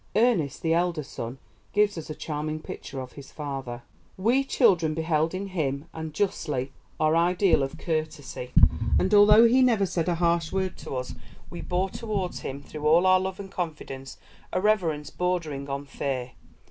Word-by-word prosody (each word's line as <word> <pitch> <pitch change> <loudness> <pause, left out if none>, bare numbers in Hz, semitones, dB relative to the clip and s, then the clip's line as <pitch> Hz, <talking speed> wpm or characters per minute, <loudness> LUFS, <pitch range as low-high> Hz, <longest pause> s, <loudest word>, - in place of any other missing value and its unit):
Ernest, 215 - +2
the 165 0 +2
elder 170 -2 +1
son, 120 -1 -6 0.4
gives 205 0 +3
us 165 -2 -7
a 155 - -4
charming 155 0 -4
picture 135 - -7
of 130 -1 -7
his 140 -2 -12
father: 135 -5 -5 0.3
"We 235 +8 +3
children 180 - +3
beheld 160 +1 0
in 195 +1 -4
him, 145 -5 -2
and 160 -1 -5
justly, 150 -8 -1 0.3
our 155 +1 +3
ideal 175 0 +3
of 135 0 -3
courtesy, 155 -6 -3 0.5
and 190 - +1
although 210 +2 +8
he 255 +3 +4
never 230 -6 +4
said 175 -2 -1
a 175 - +1
harsh 170 -1 +1
word 190 -1 -1
to - - -6
us, 125 0 -4 0.4
we 175 - -6
bore 185 +1 -1
towards 205 -5 -3
him, 140 +1 -6
through 150 +1 -4
all 165 +4 +5
our 185 0 +6
love 190 0 -4
and 195 -1 -8
confidence, 150 -6 -5 0.3
a - - 0
reverence 170 -8 +1
bordering 160 -6 -2
on 140 +1 -3
fear. 130 -3 -3
165 Hz, 170 wpm, -26 LUFS, 145-190 Hz, 0.5 s, although